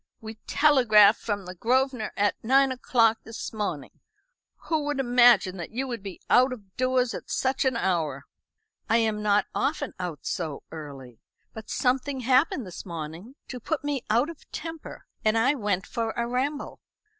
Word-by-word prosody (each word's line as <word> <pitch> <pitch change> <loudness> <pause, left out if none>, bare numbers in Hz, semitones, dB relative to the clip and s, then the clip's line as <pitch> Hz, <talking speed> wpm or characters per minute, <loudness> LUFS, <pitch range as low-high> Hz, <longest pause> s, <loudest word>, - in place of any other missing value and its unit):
We 220 0 -9
telegraphed 240 -8 +5
from 205 -3 -3
the 180 - -7
Grosvenor 250 +3 0
at 205 0 0
nine 270 +3 +4
o'clock 230 -3 +2
this 225 +1 -7
morning. 200 -10 -4 0.7
Who 315 -3 0
would 290 -1 -2
imagine 240 -6 +4
that 170 - -6
you 260 +4 -3
would 240 -4 -5
be 195 -2 -8
out 255 +2 +5
of 200 -6 -10
doors 255 -1 +1
at - - -8
such 265 +1 0
an 255 -2 +1
hour?" 160 - -1 0.6
"I 230 - +4
am 220 -2 0
not 205 0 +2
often 285 -1 -1
out 175 -5 -5
so 160 -5 -3
early. 135 -7 -9 0.3
But 220 -1 -10
something 260 +1 0
happened 260 +1 +2
this 180 - -8
morning 170 - -8
to 250 - -6
put 300 +6 -3
me 290 -3 -2
out 240 +9 +2
of 330 - -17
temper, 325 0 -8 0.2
and 215 +1 +2
I 255 +5 +3
went 205 -8 -1
for 230 -2 -3
a 235 - 0
ramble." 265 +5 -3
230 Hz, 170 wpm, -26 LUFS, 200-260 Hz, 0.7 s, telegraphed